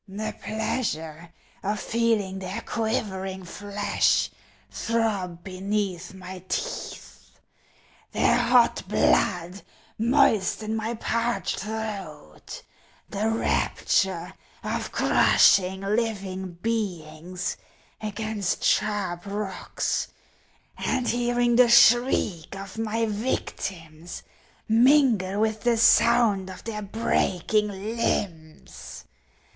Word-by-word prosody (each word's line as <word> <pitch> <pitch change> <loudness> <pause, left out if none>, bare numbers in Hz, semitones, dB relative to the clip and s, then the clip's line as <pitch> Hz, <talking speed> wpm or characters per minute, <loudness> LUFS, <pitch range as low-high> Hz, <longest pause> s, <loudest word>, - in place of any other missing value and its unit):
The 210 +3 -4
pleasure 170 -8 -3 0.3
of 210 +2 -2
feeling 220 -5 0
their 190 +4 -5
quivering 190 -5 -3
flesh 205 +3 0 0.4
throb 200 -7 -1
beneath 190 -1 -3
my 185 -1 -9
teeth, - - -6 0.7
their - - +3
hot 245 0 +4
blood 180 +2 +1 0.4
moisten 225 -4 +2
my 225 +1 -2
parched 230 -3 -1
throat; 205 -7 -6 0.5
the 210 +2 0
rapture 190 -5 0 0.3
of - - -3
crushing 190 0 +4
living 195 -3 -2
beings 180 -4 -3 0.5
against 215 -2 -3
sharp 200 -4 0
rocks, 200 -1 -2 0.7
and 255 -2 0
hearing 240 0 +1
the 250 -1 +6
shriek 235 -7 +4
of 195 +2 -8
my 225 +1 0
victims 175 -7 -4 0.4
mingle 230 -5 +4
with 220 0 0
the 240 -1 +2
sound 225 -4 +4
of 185 - -10
their 215 -2 -5
breaking 210 -1 0
limbs. 195 -6 -4
205 Hz, 85 wpm, -25 LUFS, 185-225 Hz, 0.7 s, the